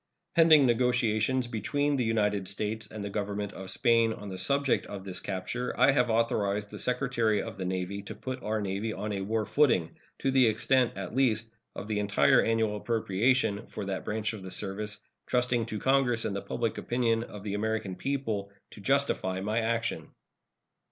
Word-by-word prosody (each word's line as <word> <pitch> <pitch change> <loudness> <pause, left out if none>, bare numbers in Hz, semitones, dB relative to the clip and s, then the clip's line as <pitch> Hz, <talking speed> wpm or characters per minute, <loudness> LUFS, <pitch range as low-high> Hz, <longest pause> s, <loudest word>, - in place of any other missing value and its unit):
Pending 160 -4 +7
negotiations 125 0 +2
between 145 +6 0
the 130 - +1
United 105 -4 +1
States 105 +3 -3
and 110 -1 -6
the 100 - -4
Government 100 0 -3
of 95 -1 -8
Spain 115 0 +3
on 105 -2 -8
the 95 - -6
subject 140 -1 +1
of 100 -2 -7
this 95 -1 -5
capture, 100 +7 -4
I - - +7
have 125 -3 +2
authorized 105 -3 0
the 105 - -7
Secretary 125 -4 +1
of - - -7
the 95 - -2
Navy 95 +2 -3
to 100 - -8
put 130 0 -5
our 110 +1 -1
Navy 100 +2 -2
on 105 0 -4
a 100 - -2
war 110 +2 -1
footing, 125 - +2 0.2
to 135 - 0
the 130 -2 +5
extent, 125 +3 +2
at 95 0 -5
least, 115 -4 +1 0.2
of - - -6
the 105 -1 -1
entire 105 +6 +4
annual 110 -2 +1
appropriation 110 +1 +1
for - - -6
that 95 -1 -3
branch 110 +1 -2
of 105 - -7
the 95 - -7
service, 105 +2 -3 0.3
trusting 125 -2 +1
to 110 - -4
Congress 130 -1 +2
and 100 - -2
the 100 - -2
public 115 -2 -2
opinion 115 -2 +1
of 105 -4 -8
the 100 -2 -3
American 110 -2 -2
people 115 -8 -2 0.2
to 105 - -11
justify 130 -7 +1
my 105 +4 0
action. 115 0 -1
110 Hz, 185 wpm, -29 LUFS, 100-125 Hz, 0.3 s, Pending